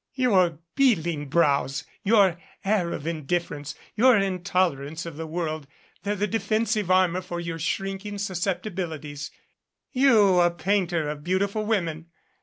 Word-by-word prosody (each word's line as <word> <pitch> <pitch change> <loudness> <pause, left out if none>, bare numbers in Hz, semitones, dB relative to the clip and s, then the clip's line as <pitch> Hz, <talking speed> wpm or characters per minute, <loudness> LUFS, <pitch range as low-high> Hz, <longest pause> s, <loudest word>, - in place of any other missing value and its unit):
Your 190 - +3 0.2
beetling 170 - +1
brows, 140 -3 +2 0.2
your 195 -5 +4 0.3
air 195 -4 +1
of 145 - -5
indifference, 155 -2 -3 0.2
your 250 +1 +6
intolerance 180 -6 0
of 165 -3 -7
the 160 +1 -5
world, 155 -3 -3 0.3
they're 205 +1 -1
the 205 +1 0
defensive 215 -1 0
armor 185 -1 +3
for 175 -1 -5
your 170 -1 -4
shrinking 195 +5 -3
susceptibilities 175 -6 -3 0.6
you 220 -9 +5
a 175 0 +5
painter 175 -3 0
of 150 0 -5
beautiful 200 +4 0
women! 170 -7 -1
180 Hz, 125 wpm, -25 LUFS, 160-200 Hz, 0.6 s, your